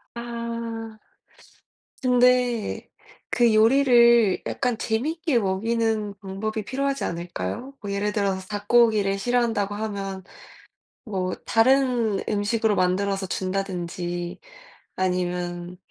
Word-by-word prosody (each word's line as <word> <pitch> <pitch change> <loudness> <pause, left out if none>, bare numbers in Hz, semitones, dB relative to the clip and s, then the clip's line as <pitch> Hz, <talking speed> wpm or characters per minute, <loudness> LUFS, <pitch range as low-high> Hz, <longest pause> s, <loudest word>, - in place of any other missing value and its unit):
아. 230 -1 -5 1.1
근데 250 -2 +2 0.4
그 235 -3 +3
요리를 235 -3 +5
약간 250 -4 -1
재미있게 290 +5 0
먹이는 215 +1 0
방법이 210 +2 -4
필요하지 275 +4 -2
않을까요? 170 - -5
뭐 200 - -6
예를 205 +1 -1
들어서 195 -2 0
'닭고기를 205 -1 +2
싫어한다.'고 230 -3 0
하면 200 -3 -4 0.8
뭐 185 -4 -2
다른 240 -3 +3
음식으로 210 +1 +1
만들어서 195 +2 0
준다든지 175 -2 -3 0.6
아니면 180 -1 -2
215 Hz, 235 characters per minute, -24 LUFS, 190-235 Hz, 1.1 s, 요리를